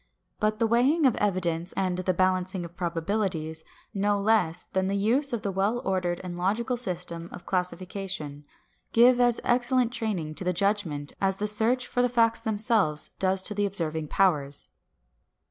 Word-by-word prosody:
But 215 0 0
the 230 - +1
weighing 260 +8 +3
of 255 - +4
evidence 175 -4 -1
and 185 -2 0
the 185 0 0
balancing 185 0 0
of 170 +1 -12
probabilities, 170 -2 -2 0.3
no 205 +1 +1
less 200 -6 +1
than 190 0 -2
the 195 - -1
use 250 +8 +4
of 235 -3 -3
the 200 - -1
well 200 +5 0
ordered 180 -2 -1
and 180 -1 -6
logical 215 +8 -1
system 180 -7 -1
of 175 - -10
classification, 180 -5 -3 0.5
give 245 +2 +6
as 245 -1 +3
excellent 245 0 +2
training 210 -10 -3
to - - -2
the 180 0 0
judgment 175 -7 -1
as 195 -1 +1
the 210 - -2
search 225 +4 +2
for 245 - -1
the 245 - +2
facts 230 -1 +2
themselves 210 -8 +1
does 190 0 +1
to 210 - -2
the 205 0 0
observing 160 -5 -3
powers. 145 -6 +1
195 Hz, 165 wpm, -26 LUFS, 175-225 Hz, 0.5 s, give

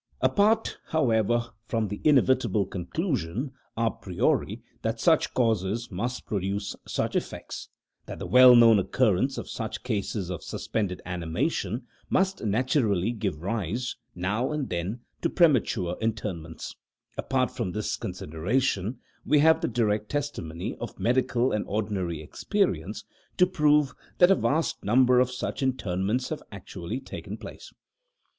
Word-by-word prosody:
Apart, 215 +2 +2
however, 120 -5 +1 0.2
from 115 -2 0
the 105 - -5
inevitable 130 -8 +3
conclusion, 120 - -2 0.3
a 115 -1 +2
priori 90 -3 -1 0.2
that - - -2
such - - +3
causes 115 -2 0
must 120 +7 -3
produce 100 0 -2
such - - -1
effects - - -4 0.4
that - - -6
the - - -5
well 125 -1 +8
known 115 -3 +7
occurrence 125 +5 +1
of - - -5
such 110 -2 -5
cases 100 -5 -2
of 90 - -4
suspended 100 -5 -3
animation 90 - -2 0.2
must 190 0 +1
naturally 110 - +1
give 100 -9 -3
rise, 110 +4 -2 0.2
now 105 +9 -1
and 150 -3 -2
then, 90 +8 -3 0.2
to - - +1
premature 120 - +2
interments 105 -8 -3 0.4
apart - - 0
from 90 - -3
this 105 +3 -2
consideration, 100 - -1 0.3
we 150 - +3
have 160 +2 +5
the - - +1
direct 105 -3 0
testimony 110 - -3
of 120 - -7
medical 125 0 +2
and 105 - 0
ordinary 95 -6 -2
experience 105 - -1 0.3
to 180 - +6
prove 150 -5 +3 0.2
that 180 +1 +6
a - - +7
vast 160 -1 0
number 125 +3 +5
of 125 0 +3
such 130 +2 -4
interments 120 -2 0
have 155 - -4
actually 100 +2 -6
taken - - -7
place. - - -10
115 Hz, 135 wpm, -27 LUFS, 95-130 Hz, 0.4 s, well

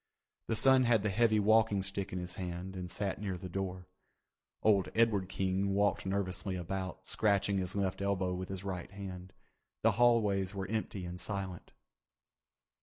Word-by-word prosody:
The 115 - 0
son 130 +2 +6
had 115 -4 +3
the 105 - +1
heavy 110 +1 +3
walking 105 -1 +4
stick 100 0 -4
in 90 - -3
his 90 0 -4
hand 90 +1 -5
and 90 -1 -5
sat 100 +1 -3
near 95 -3 -2
the 90 +1 -7
door. 90 0 -4 0.8
Old 100 -3 +4
Edward 110 -5 +2
King 95 +1 0
walked 100 -1 +1
nervously 95 0 -1
about, 95 +1 -4
scratching 100 -2 +2
his 95 +1 -2
left 100 -1 -1
elbow 95 -2 0
with 90 +1 -5
his 95 -1 -5
right 95 -3 -4
hand. 95 -2 -8 0.5
The 115 - +5
hallways 105 -5 +3
were 95 -1 -3
empty 105 -4 -3
and 90 +1 -5
silent. 95 -3 -4
95 Hz, 165 wpm, -33 LUFS, 95-105 Hz, 0.8 s, son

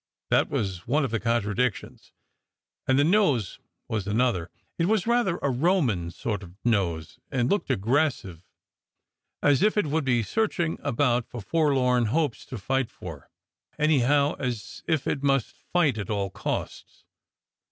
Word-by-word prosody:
That - - +3
was 95 -4 -3
one 140 +4 +2
of 130 - -4
the 115 - 0
contradictions, 115 0 -1 0.8
and 130 - +3
the 140 - +5
nose 150 - +2 0.3
was 105 -3 -3
another. 105 -5 +1 0.3
It 165 - +3
was 215 -2 +2
rather 235 -7 +2
a 140 - +2
Roman 125 - +1
sort 105 +4 -4
of 90 -2 -12
nose, 85 -9 0
and 125 -2 0
looked 205 - 0
aggressive, 115 - 0 1.0
as 145 0 +4
if 210 +1 +3
it 210 - +3
would 155 +1 0
be 120 -3 +2
searching 175 - -1
about 125 -3 +1
for 125 - -9
f 105 - -10
orlorti 130 -7 +3
hopes 145 +1 -1
to 125 - -6
fight 135 +4 -1
for; 80 - -10 0.5
anyhow, 145 -1 +3
as 120 -4 -4
if 160 -5 +1
it 140 - -1
must 135 -4 +1 0.2
fight 150 -10 +2
at 100 - -5
all 100 -2 -1
costs. - - -5
125 Hz, 150 wpm, -26 LUFS, 105-150 Hz, 1.0 s, the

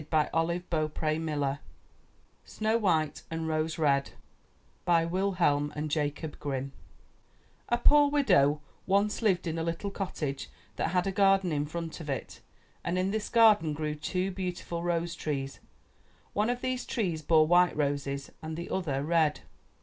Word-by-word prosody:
34 155 +1 +1
UP 170 +2 -1
ONE 155 -1 +1
PAIR 155 0 -1
OF 160 +1 -1
STAIRS 145 -3 -1 0.9
SNOW 220 +1 0
WHITE 160 -8 +1
AND 165 0 -3
ROSE 155 0 -1
RED 140 -3 +2 0.8
Wilhelm 170 -4 +2
and 150 0 -3
Jacob 150 0 -2
Grimm 135 -1 -3 1.0
A 240 - +3
poor 290 +4 +5
widow 180 - +3 0.3
once 200 +3 +2
lived 190 -5 +2
in 165 -1 -2
a - - -1
little 170 +4 -3
cottage 150 -9 -4 0.3
that - - 0
had 180 +2 +1
a 195 - 0
garden 195 -2 +3
in 145 -1 -1
front 165 +1 -5
of 155 -3 -7
it, 135 - -4 0.4
and 175 +1 -1
in 185 +1 +1
this 215 0 -2
garden 215 -9 +5
grew 150 0 -2
two 185 +5 -2
beautiful 180 -2 -4
rose 170 0 -1
trees. 135 -3 -4 0.7
One 210 +3 +1
of 245 0 -1
these 255 -1 -2
trees 180 -9 -1
bore 155 0 +4
white 175 +1 +4
roses 140 -1 -2
and 160 0 -5
the 170 - -6
other 145 -7 -1
red. 155 -2 +2
165 Hz, 155 wpm, -29 LUFS, 150-190 Hz, 1.0 s, poor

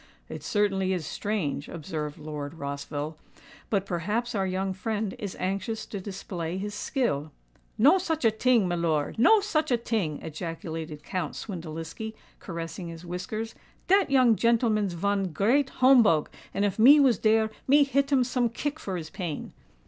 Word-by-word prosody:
"It - - -6
certainly 195 -3 +1
is 175 -4 -3
strange," 170 -9 -2
observed 155 -3 -5
Lord 150 0 -6
Rossville. 145 +1 -5 0.5
"But 200 -3 +1
perhaps 210 +8 -2
our 195 -3 0
young 190 +1 -1
friend 210 +1 -2
is 200 -3 -5
anxious 195 +4 -2
to 200 - -6
display 185 -3 -5
his 205 +2 -4
skill——" 205 - -1 0.5
"No 290 - +6
such 320 -6 -1
a 225 - +6
ting, 225 -2 +3
milor—no 175 - +3
such 315 -7 0
a 245 - +3
ting!" 210 -10 -2
ejaculated 160 -1 -6
Count 180 -4 -3
Swindeliski, 170 +3 -6 0.2
caressing 170 0 -6
his 165 +1 -9
whiskers. 215 +6 -4 0.3
"Dat 390 -1 +4
young 255 -4 +5
gentelman's 220 -4 +2
von 195 0 0
great 250 - +2
homebogue; 240 - +5 0.2
and 200 - 0
if 205 +1 -2
me 275 +7 +9
was 260 -8 +4
dere, 220 0 +3 0.2
me 285 +2 +6
hit 275 +1 +1
him 265 -3 +4
some 245 -1 0
kick 290 +6 -3
for 190 -8 -4
his 160 -2 -7
pain." 170 -7 -5
200 Hz, 155 wpm, -27 LUFS, 165-235 Hz, 0.5 s, me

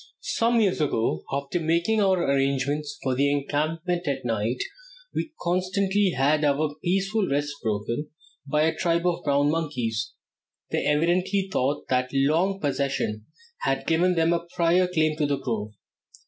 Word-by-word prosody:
Some 230 +1 +3
years 195 -6 +2
ago, 115 - 0
after 140 +5 -2
making 170 +7 +1
our 190 -3 +3
arrangements 140 +1 0
for 130 - 0
our 130 - -2
encampment 155 +5 0
at 140 -3 -2
night, 115 +1 -1 0.5
we 315 - -3
constantly 185 +2 +1
had 145 +3 +3
our 145 +1 +1
peaceful 195 +3 +1
rest 145 +1 0
broken 115 +6 -2 0.4
by 150 +2 +2
a 160 0 +1
tribe 170 0 0
of 175 -1 0
brown 145 0 +2
monkeys. 125 -10 -2 0.6
They - - 0
evidently 180 +6 +1
thought 140 0 -1
that 125 0 +1
long 160 +8 +2
possession 135 - -1 0.3
had 485 - -1
given 175 +3 +2
them 165 0 +3
a 170 0 -2
prior 180 +1 +3
claim 155 -3 +1
to 150 -2 +1
the 140 -1 0
grove. 110 -5 -3
155 Hz, 150 wpm, -25 LUFS, 140-180 Hz, 0.6 s, Some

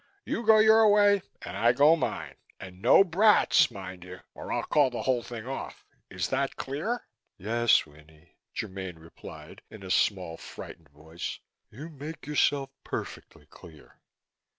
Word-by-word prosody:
You 230 - -3
go 220 0 +6
your 220 0 +6
way 205 -1 +4 0.2
and - - -7
I 120 +1 +3
go 145 +6 +5
mine. 165 - -4 0.3
And 95 0 -11
no 125 - +6
brats, 200 +4 +4
mind 95 -5 -9
you! 90 0 -11
or - - -8
I'll - - -1
call 145 -3 +2
the 120 - -5
whole 130 -2 +1
thing 115 -1 -8
off. 135 +1 -7 0.2
Is 90 -1 -3
that 135 +1 -1
clear?" 165 - -4 0.3
"Yes, 115 +4 +2
Winnie," 75 +2 -20 0.2
Germaine 95 -4 -5
replied, 80 0 -13
in 110 -2 -12
a 95 - -6
small, 90 -6 0
frightened - - -11
voice. 80 +4 -7 0.3
"You 140 +9 -9
make 155 0 -9
yourself 145 -2 +1
perfectly - - -7
clear." 80 -4 -17
120 Hz, 150 wpm, -27 LUFS, -, 0.3 s, go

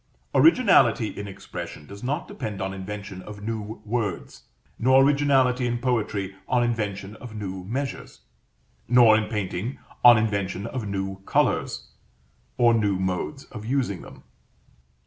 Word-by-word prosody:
Originality 160 - +5
in 100 - -7
expression 95 -5 -8
does 100 +5 -11
not 145 +7 -2
depend 110 -6 -5
on 95 0 -3
invention 95 0 -7
of 100 +1 -10
new 110 -1 -5
words; 105 -5 -3 0.3
nor 130 +2 +5
originality 135 -3 +3
in 120 0 -1
poetry 105 -6 -1
on 125 -1 +2
invention 105 -4 -2
of 120 -3 -10
new 95 -3 -5
measures; 135 +7 -5 0.7
nor, 120 -2 +7
in 110 -1 0
painting, 105 +2 -3 0.3
on 120 -2 +9
invention 100 -3 -1
of 115 -2 -4
new 95 -1 -3
colors, - - 0 0.7
or 120 -1 +5
new 105 -4 +2
modes 95 +10 -2
of 105 -3 -8
using 120 -6 -1
them. - - -13
110 Hz, 135 wpm, -25 LUFS, 100-125 Hz, 0.7 s, on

